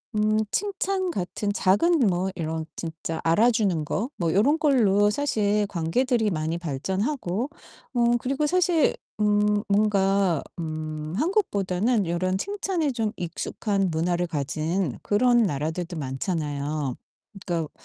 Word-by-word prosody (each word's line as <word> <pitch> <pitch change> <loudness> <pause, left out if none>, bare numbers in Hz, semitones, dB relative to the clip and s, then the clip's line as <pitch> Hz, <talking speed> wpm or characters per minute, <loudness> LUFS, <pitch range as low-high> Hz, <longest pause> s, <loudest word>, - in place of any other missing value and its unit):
음 215 0 +2
칭찬 390 -2 -1
같은 205 - -2
작은 295 - +3
뭐 185 +1 0
이런 160 -1 -3
진짜 165 0 -5
알아주는 200 -3 +3
거 225 - -2
뭐 165 -3 0
요런 280 - +3
걸로 210 -9 +4
사실 210 -5 +1
관계들이 220 +7 +1
많이 160 +1 -1
발전하고 190 - -2 0.4
어 240 -2 +2 0.2
그리고 275 +5 -1
사실 350 -1 +3 0.2
음 210 0 +2
뭔가 195 -4 +2 0.2
음 155 -1 -4
한국보다는 225 - +1
요런 185 +2 0
칭찬에 380 - -1
좀 225 -4 -1
익숙한 195 +3 -2
문화를 175 +2 0
가진 155 +2 -2
그런 240 +3 +3
나라들도 160 +1 -2
많잖아요. 145 -1 -2 0.5
그러니까 165 -4 -2
195 Hz, 260 characters per minute, -25 LUFS, 165-235 Hz, 0.5 s, 걸로